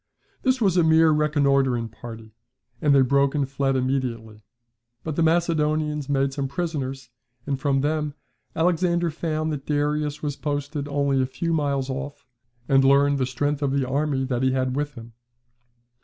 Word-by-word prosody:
This 260 -1 +1
was 195 -5 +2
a 175 - +5
mere 160 0 +5
reconnoitring 140 -5 +2
party, 115 -1 -10 0.5
and 145 -2 +4
they 135 - +6
broke 140 +2 +2
and 140 -2 0
fled 135 0 0
immediately; 120 -5 -2 0.6
but 155 -2 -4
the 165 - 0
Macedonians 155 -3 +1
made 135 -1 +1
some 140 -1 -2
prisoners, 135 -5 -4 0.3
and 140 -2 -2
from 135 -1 +1
them 150 0 -1 0.4
Alexander 170 0 +1
found 155 0 -2
that 140 -2 -6
Darius 150 0 -1
was 145 -2 -2
posted 145 0 -3
only 140 -2 +1
a 130 - 0
few 165 +5 -2
miles 140 -4 0
off 140 +1 -6 0.4
and 135 -1 +4
learned 140 +1 +4
the 130 - 0
strength 145 +3 -1
of 140 - +1
the 135 -2 0
army 140 0 0
that 125 -2 -2
he 130 0 +2
had 130 -1 0
with 145 0 -3
him. 115 -1 -11
140 Hz, 165 wpm, -24 LUFS, 135-150 Hz, 0.6 s, they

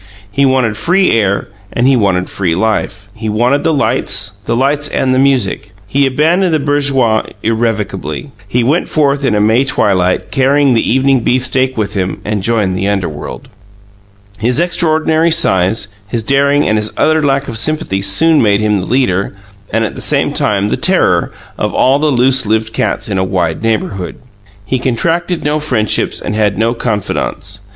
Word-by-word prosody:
He 140 +3 +2
wanted 125 -5 +1
free 180 - +2
air 100 -3 0 0.2
and 120 +2 +1
he 135 - +4
wanted 95 -5 0
free 90 -4 -2
life; 105 0 -2
he 110 +1 -5
wanted 120 +7 +1
the 165 - +2
lights, 135 -8 +1
the - - -2
lights 145 +3 +1
and 130 -2 0
the 130 - +1
music. 135 -7 0
He 135 +7 +1
abandoned 160 +6 +1
the - - +1
bourgeoise 140 -6 +1
irrevocably. 110 - -2 0.2
He 120 +4 0
went 150 +9 0
forth 140 -2 +1
in 130 -6 +1
a - - +1
May 110 +5 +3
twilight, 95 -8 0
carrying 140 0 +2
the 115 - +1
evening 135 +1 +2
beefsteak 130 +2 0
with 110 -2 -2
him, 95 -2 -3
and 105 -1 -2
joined 105 -3 0
the 95 +2 -2
underworld. 95 - -4 0.9
His 120 +6 0
extraordinary 160 -2 +1
size, 100 - +2 0.2
his 115 +2 -2
daring 140 +3 +2
and 110 0 +1
his 105 0 -3
utter 155 0 +2
lack 140 -1 0
of 115 -4 0
sympathy 135 -9 0
soon 150 +11 +4
made 100 -2 +2
him 105 -1 +1
the 90 - -5
leader 100 -7 0 0.3
and, 115 +1 0
at - - -5
the - - -9
same - - +1
time, 100 -1 +1
the - - -1
terror - - +1 0.3
of - - -2
all 135 +2 +3
the 155 - +1
loose 130 -3 +3
lived 110 +1 -1
cats - - -1
in 100 -3 -2
a - - +1
wide 90 -4 -2
neighbourhood. 110 -4 -2 0.5
He 130 +4 -1
contracted 165 +8 -1
no 150 +1 0
friendships 120 -9 0
and - - -4
had 105 -2 0
no 115 +2 +1
confidants. 105 -3 -3
115 Hz, 175 wpm, -13 LUFS, 105-140 Hz, 0.9 s, he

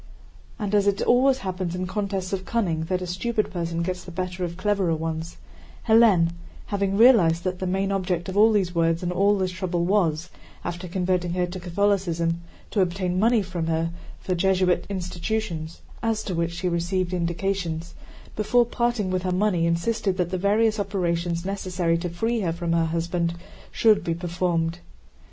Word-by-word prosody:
And 210 -4 -3
as 205 -1 +3
it 200 -1 +2
always 260 +2 +4
happens 185 -2 -3
in 185 0 -2
contests 195 -1 -3
of 190 -1 -2
cunning 180 -8 -1
that 185 +1 -1
a - - -3
stupid 215 +5 -1
person 170 -2 -2
gets 180 0 -3
the - - -10
better 180 +1 -4
of 170 -1 -4
cleverer 190 -3 +1
ones, 160 +1 -4 0.5
Hélène—having 195 -1 +2
realized 190 -9 +6
that 185 0 -2
the 185 - -2
main 195 +2 0
object 180 -3 -1
of 190 - -5
all 215 +2 +6
these 190 -5 +1
words 165 0 +1
and 175 - -1
all 200 +3 +3
this 185 -1 -1
trouble 180 -2 -2
was, 175 -3 +1 0.3
after 175 +1 -4
converting 180 -1 0
her 180 0 +1
to 180 +1 -6
Catholicism, 175 -2 0 0.3
to 205 - +2
obtain 180 0 0
money 225 0 +3
from 175 -3 -4
her 165 0 0 0.3
for 185 - -2
Jesuit 185 0 +2
institutions 180 -2 -3 0.2
(as 225 -2 0
to 190 - -4
which 170 0 -1
she 175 +2 -2
received 175 +1 -1
indications)—before 180 +5 -1
parting 235 -5 -1
with 185 0 0
her 185 0 -1
money 180 -3 +2
insisted 185 +3 0
that 180 -2 -1
the 185 - 0
various 215 +3 +2
operations 175 -3 -1
necessary 185 -4 -1
to 175 +1 -3
free 225 +7 -1
her 180 -5 0
from 170 0 -3
her 165 -1 +2
husband 170 +1 -1 0.4
should 220 -2 +4
be 165 - -1
performed. 170 -1 -1
180 Hz, 170 wpm, -25 LUFS, 170-200 Hz, 0.5 s, realized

